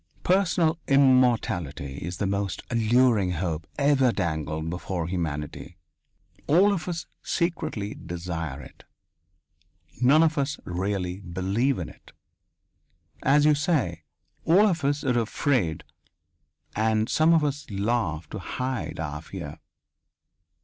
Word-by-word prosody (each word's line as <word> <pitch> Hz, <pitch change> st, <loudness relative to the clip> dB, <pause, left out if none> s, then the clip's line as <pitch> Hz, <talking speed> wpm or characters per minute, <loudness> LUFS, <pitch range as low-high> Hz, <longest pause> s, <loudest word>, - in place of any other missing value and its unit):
Personal 175 Hz, -3 st, +2 dB
immortality 115 Hz, -, +2 dB
is 90 Hz, +1 st, -5 dB
the 100 Hz, -, -1 dB
most 100 Hz, -3 st, -2 dB
alluring 115 Hz, -4 st, +3 dB
hope 85 Hz, -2 st, -3 dB
ever 140 Hz, -3 st, +3 dB
dangled 80 Hz, -5 st, -2 dB
before 90 Hz, 0 st, -3 dB
humanity. 80 Hz, -1 st, -4 dB, 0.7 s
All 190 Hz, +7 st, +5 dB
of 165 Hz, -4 st, -4 dB
us 170 Hz, -2 st, -3 dB, 0.2 s
secretly 160 Hz, -, -2 dB
desire 85 Hz, -5 st, -5 dB
it. -, -, -15 dB, 1.2 s
None 145 Hz, +6 st, +6 dB
of 155 Hz, -2 st, +1 dB
us 140 Hz, +1 st, -1 dB
really 90 Hz, 0 st, -2 dB
believe 100 Hz, +8 st, -1 dB
in 85 Hz, -, -4 dB
it. -, -, -16 dB, 1.1 s
As 145 Hz, +2 st, +4 dB
you 150 Hz, -, +6 dB
say, 145 Hz, -, 0 dB, 0.4 s
all 185 Hz, +6 st, +5 dB
of 175 Hz, -7 st, 0 dB
us 145 Hz, +1 st, 0 dB
are 125 Hz, -3 st, +2 dB
afraid 110 Hz, -, 0 dB, 0.9 s
and 110 Hz, 0 st, +1 dB
some 155 Hz, +5 st, +3 dB
of 160 Hz, -, +3 dB
us 145 Hz, 0 st, -3 dB
laugh 100 Hz, -6 st, -1 dB
to 105 Hz, -, -5 dB
hide 125 Hz, +3 st, -4 dB
our 75 Hz, -2 st, -4 dB
fear. 75 Hz, -, -8 dB
110 Hz, 120 wpm, -26 LUFS, 85-145 Hz, 1.2 s, None